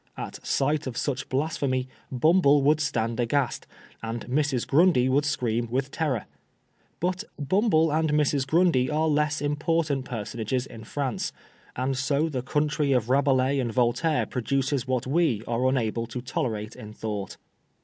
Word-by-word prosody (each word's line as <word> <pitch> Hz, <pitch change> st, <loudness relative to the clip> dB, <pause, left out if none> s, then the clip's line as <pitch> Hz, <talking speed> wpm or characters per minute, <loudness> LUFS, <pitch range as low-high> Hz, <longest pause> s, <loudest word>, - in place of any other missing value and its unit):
At -, -, -7 dB
sight 145 Hz, +1 st, 0 dB
of 125 Hz, -2 st, -5 dB
such 135 Hz, -3 st, -2 dB
blasphemy 130 Hz, -2 st, -1 dB, 0.2 s
Bumble 145 Hz, +1 st, +4 dB
would 150 Hz, +2 st, +4 dB
s^iuxd 115 Hz, -6 st, -1 dB
aghast, 125 Hz, +2 st, 0 dB, 0.3 s
.and 115 Hz, +1 st, -4 dB
Mrs. 135 Hz, -1 st, 0 dB
Grundy 150 Hz, -4 st, +4 dB
would 140 Hz, +3 st, +2 dB
scream 120 Hz, -5 st, 0 dB
with 135 Hz, +3 st, -1 dB
terror. 145 Hz, -9 st, -1 dB, 0.7 s
But 180 Hz, +3 st, -1 dB
Bumble 160 Hz, -, +2 dB
and 160 Hz, 0 st, +1 dB
Mrs. 145 Hz, -2 st, +1 dB
Grundy 160 Hz, -6 st, +3 dB
are 155 Hz, +1 st, +1 dB
less 150 Hz, 0 st, +1 dB
important 150 Hz, -1 st, 0 dB
personages 120 Hz, +2 st, -3 dB
in 110 Hz, -4 st, -11 dB
France, 135 Hz, -1 st, -2 dB, 0.4 s
and 130 Hz, +2 st, -1 dB
so 140 Hz, +4 st, +1 dB
the 130 Hz, -5 st, -2 dB
country 145 Hz, +1 st, 0 dB
of 125 Hz, -1 st, +1 dB
Rabelais 135 Hz, 0 st, +3 dB
and 120 Hz, -3 st, -1 dB
Voltaire 125 Hz, +7 st, +1 dB
produces 135 Hz, +1 st, -1 dB
what 130 Hz, -1 st, 0 dB
we 135 Hz, -6 st, +1 dB
are 120 Hz, +2 st, +1 dB
unable 115 Hz, -3 st, -1 dB
to 125 Hz, +2 st, -5 dB
tolerate 115 Hz, -3 st, -3 dB
in 105 Hz, 0 st, -10 dB
thought." 105 Hz, -3 st, -5 dB
135 Hz, 150 wpm, -26 LUFS, 125-150 Hz, 0.7 s, Bumble